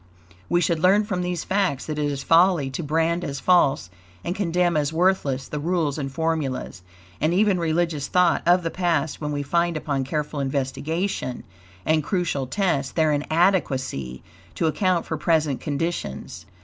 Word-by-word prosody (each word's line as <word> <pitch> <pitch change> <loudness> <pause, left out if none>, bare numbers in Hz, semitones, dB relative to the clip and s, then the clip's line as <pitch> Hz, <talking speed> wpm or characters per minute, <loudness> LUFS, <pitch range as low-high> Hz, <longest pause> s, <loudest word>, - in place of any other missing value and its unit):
We 175 - +2
should 170 -1 +1
learn 190 +5 +4
from 190 -4 -2
these 180 -2 -2
facts 185 -8 0
that 155 -1 -4
it 145 -1 0
is 140 -1 -4
folly 165 -5 +4
to 135 - -4
brand 165 +3 0
as 140 -1 -4
false 140 - +3 0.3
and 175 - -3
condemn 180 -3 +1
as 150 -1 +1
worthless 160 -6 +1
the 150 - -4
rules 160 -2 -1
and 135 -2 -4
formulas, 150 - -2 0.4
and 160 +4 +2
even 200 -2 +3
religious 165 -3 0
thought, 180 -2 +3
of 175 +1 +5
the 165 - -2
past 160 -5 -1
when 150 -1 -2
we 145 -1 -2
find 170 +2 0
upon 140 -3 -2
careful 150 +2 -3
investigation 140 +3 -2 0.4
and 155 -1 +2
crucial 165 -7 -1
tests 140 -6 0
their 160 -2 +2
inadequacy 145 - 0 0.3
to - - 0
account 180 +2 +1
for 160 - -3
present 155 -4 +1
conditions. 145 - -4
160 Hz, 160 wpm, -23 LUFS, 140-175 Hz, 0.4 s, of